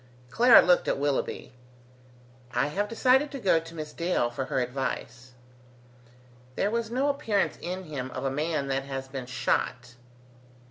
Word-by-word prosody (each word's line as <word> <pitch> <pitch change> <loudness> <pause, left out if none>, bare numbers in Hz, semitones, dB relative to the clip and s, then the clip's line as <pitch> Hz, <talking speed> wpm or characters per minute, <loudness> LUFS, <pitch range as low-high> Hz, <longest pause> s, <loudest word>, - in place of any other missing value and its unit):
Clara 240 - +7
looked 180 -1 +3
at - - +1
Willoughby. 140 -2 -2 1.0
"I 125 +4 +2
have 205 +6 -2
decided 260 +5 +3
to 275 - -5
go 185 -7 +3
to 165 +1 -11
Miss 155 -1 -6
Dale 170 -8 0
for 130 +2 -3
her 135 - -1
advice." 125 -1 -4 1.2
There 200 - 0
was 230 -1 -1
no 260 +4 0
appearance 255 -9 0
in 185 +2 -4
him 140 -6 -5
of 130 +1 -5
a 135 - 0
man 150 +1 -1
that 135 0 -1
has 135 -1 -5
been 135 -2 -6
shot. 125 -1 -1
150 Hz, 155 wpm, -27 LUFS, 130-200 Hz, 1.2 s, Clara